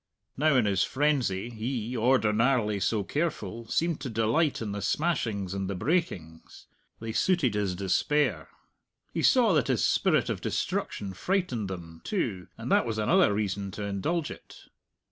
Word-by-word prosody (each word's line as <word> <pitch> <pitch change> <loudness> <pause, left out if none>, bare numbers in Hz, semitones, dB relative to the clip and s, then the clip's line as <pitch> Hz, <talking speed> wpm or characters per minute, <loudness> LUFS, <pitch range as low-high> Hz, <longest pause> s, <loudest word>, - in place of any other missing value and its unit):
Now 150 +1 +3
in 125 -4 +4
his 95 -4 +2
frenzy, 130 - 0
he, 120 +1 -3
ordinarily 115 -2 +2
so 105 +1 0
careful, 115 - -3
seemed 165 +5 0
to 135 - -4
delight 115 +8 +1
in 110 -3 -4
the 100 0 -4
smashings 105 - -1
and 95 -1 -3
the 100 - -2
breakings; 90 - -3 0.3
they 115 0 -5
suited 150 - +2
his 100 -3 -1
despair. 100 - 0 0.6
He - - -1
saw - - +5
that - - +2
his - - +1
spirit - - +2
of - - -3
destruction 100 -2 -2
frightened 130 - -1
them, 85 -3 -8
too, 105 - -2
and - - -5
that - - +4
was 110 -1 -2
another 170 - +4
reason 100 -1 -2
to 105 - -5
indulge 145 - -2
it. - - -13
110 Hz, 155 wpm, -28 LUFS, 100-145 Hz, 0.6 s, saw